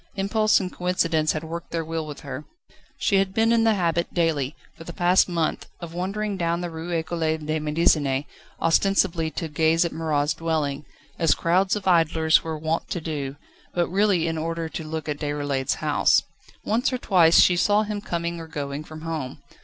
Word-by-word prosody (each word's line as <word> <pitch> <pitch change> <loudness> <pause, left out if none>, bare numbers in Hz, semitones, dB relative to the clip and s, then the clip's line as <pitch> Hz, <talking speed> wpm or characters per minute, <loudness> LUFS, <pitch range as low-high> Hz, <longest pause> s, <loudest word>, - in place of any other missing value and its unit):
Impulse 215 +2 +2
and 185 -2 -5
coincidence 170 -3 +1
had 155 - -4
worked 165 +1 -6
their 165 -1 -3
will 160 -1 -3
with 150 - -8
her. 135 0 -6 0.5
She 200 - +2
had 195 0 0
been 225 +1 +3
in 230 -1 +3
the 220 -1 +4
habit, 170 -2 0
daily, 155 -5 0 0.2
for 165 - -11
the 170 - -8
past 180 +1 +3
month, 165 -3 -1
of 170 -1 -8
wandering 195 +3 -2
down 170 -1 0
the 175 -1 -4
Rue 160 +1 -6
Ecole 165 0 -2 0.2
de 155 0 -2
Médecine, 150 -3 +1 0.3
ostensibly 165 -1 +2
to 165 +1 -4
gaze 160 +2 +2
at 170 - -2
Marat's 155 -2 0
dwelling, 150 -3 -2 0.3
as 165 -2 +4
crowds 185 +4 +2
of 205 -2 -5
idlers 160 -2 +4
were 160 -1 -4
wont 160 +2 -2
to 175 - -2
do, 145 -4 -4 0.4
but 175 -1 +1
really 190 -3 +2
in 160 -1 -2
order 165 +1 -3
to 160 - -5
look 155 0 -5
at 145 -1 -3
Déroulède's 145 -3 -1
house. - - +2 0.4
Once 230 +5 +1
or 255 - -1
twice 175 -8 +5
she 180 - +6
saw 205 +4 +3
him 210 -1 -4
coming 170 -2 -3
or 165 - -8
going 145 -1 -5
from 155 0 -10
home. 155 -5 -4
165 Hz, 190 wpm, -24 LUFS, 155-180 Hz, 0.5 s, she